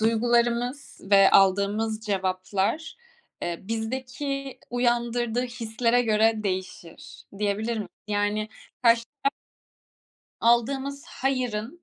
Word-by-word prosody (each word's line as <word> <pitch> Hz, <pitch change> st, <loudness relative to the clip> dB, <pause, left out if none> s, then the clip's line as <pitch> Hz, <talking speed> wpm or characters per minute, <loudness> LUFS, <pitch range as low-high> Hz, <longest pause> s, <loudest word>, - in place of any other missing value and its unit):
duygularımız 240 Hz, +4 st, +1 dB
ve 195 Hz, -1 st, +7 dB
aldığımız 200 Hz, +3 st, +3 dB
cevaplar, 195 Hz, +7 st, -1 dB, 0.5 s
eee, 170 Hz, -1 st, -3 dB
bizdeki 260 Hz, +5 st, -4 dB
uyandırdığı 240 Hz, -1 st, 0 dB
hislere 240 Hz, 0 st, 0 dB
göre 220 Hz, 0 st, +3 dB
değişir, 185 Hz, -3 st, -5 dB, 0.2 s
diyebilir 210 Hz, +3 st, -1 dB
mi 210 Hz, -, -4 dB, 0.2 s
Yani, 205 Hz, +1 st, 0 dB, 0.3 s
karşı 230 Hz, -1 st, +5 dB, 0.2 s
ta 275 Hz, -, +3 dB, 1.1 s
Aldığımız 270 Hz, +5 st, +1 dB
hayırın 255 Hz, +1 st, -2 dB
230 Hz, 85 wpm, -26 LUFS, 210-245 Hz, 1.1 s, ve